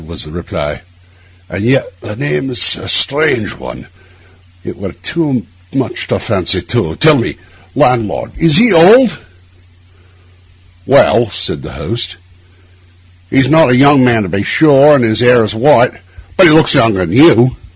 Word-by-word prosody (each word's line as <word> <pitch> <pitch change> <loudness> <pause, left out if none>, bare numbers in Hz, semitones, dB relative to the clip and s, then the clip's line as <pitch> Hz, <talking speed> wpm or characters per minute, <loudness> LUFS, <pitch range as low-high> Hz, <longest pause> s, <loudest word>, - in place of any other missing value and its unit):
was 85 0 -6
the 75 - -12
reply. 75 -3 -7 0.7
'And 100 - -6
yet 130 +3 0 0.2
the 105 - -9
name 135 -1 -4
is 125 - +2
a - - -11
strange - - +1
one; - - -11 0.8
it - - -9
were - - -8
too 140 - -4 0.3
much - - -4
to - - -2
fancy - - -1
two. 80 0 -4
Tell 155 -2 +3
me, 115 - -4 0.4
landlord, 125 -7 -1
is 165 -2 +2
he 230 -1 +3
old?' 195 - +4 1.7
'Well,' 120 -3 +2
said 90 -1 -5
the - - -11
host, 95 -6 -5 1.1
'he's 135 -1 +1
not 160 -1 +3
a 125 - +2
young 140 +1 +4
man, 120 -3 +1
to 95 - -6
be 100 - -3
sure, 145 +4 +3
and 135 - 0
his 110 -1 0
hair 125 -1 +3
is 105 - -3
white; 125 +1 +2 0.4
but 190 - +5
he - - +4
looks 160 +1 +3
younger 100 -5 +1
than 80 - -7
you. 130 -4 +4
125 Hz, 160 wpm, -11 LUFS, 110-150 Hz, 1.7 s, but